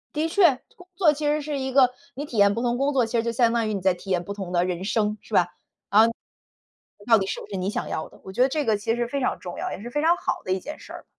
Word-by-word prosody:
的 310 +2 +1
确， 340 -4 +4 0.2
工 360 - -16
作 340 -4 +4
其 300 +1 -4
实 300 +1 +1
是 290 -1 -3
一 265 0 -3
个 255 -1 +5 0.2
你 285 +3 -4
体 250 -6 -7
验 200 0 +5
不 230 - -3
同 240 0 0
工 280 +2 +1
作， 255 -3 +3
其 225 - -5
实 225 - +1
就 235 - -1
相 235 0 +2
当 230 -2 +1
于 - - -1
你 200 - -3
在 190 0 +3
体 180 +2 -12
验 180 -2 +1
不 200 - -5
同 195 -3 -6
的 175 0 +2
人 180 0 -3
生， 210 +1 0
是 - - -15
吧， 175 -3 +4 0.4
啊 215 +3 +6 1.0
到 230 -2 +6
底 190 - -1
是 - - -4
不 - - -9
是 200 - -5
你 185 +1 -2
想 210 - -3
要 - - -4
的， - - -19
我 190 - -9
觉 245 - +2
得 260 - +5
这 300 +2 -1
个 220 -4 +2
其 210 +2 -1
实 240 0 -2
非 280 +3 -2
常 255 - 0
重 175 -1 -7
要， - - -3
也 - - -6
是 240 - -7
非 295 - -1
常 335 +2 +4
好 - - -2
的 185 - -1
一 190 - 0
件 300 - -8
事 - - -12
儿。 - - -10
235 Hz, 345 characters per minute, -24 LUFS, 200-280 Hz, 1.0 s, 啊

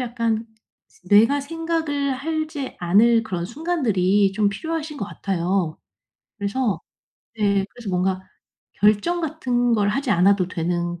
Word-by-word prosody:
약간 230 -2 -1 0.6
뇌가 230 +8 +5
생각을 320 -2 -2
하지 310 -1 -4
않을 225 +6 +4
그런 180 -5 -4
순간들이 210 - +1
좀 210 0 +2
필요하신 315 +6 -4
것 200 - -3
같아요. 180 -4 -2 0.6
그래서 205 -2 -1 0.6
네 200 -2 +2
그래서 240 -4 -9
뭔가 185 +1 0 0.5
결정 215 - +2
같은 245 -6 0
걸 205 -2 +2
하지 260 +4 -1
않아도 190 0 +3
되는 175 0 -2
220 Hz, 255 characters per minute, -22 LUFS, 195-280 Hz, 0.6 s, 뇌가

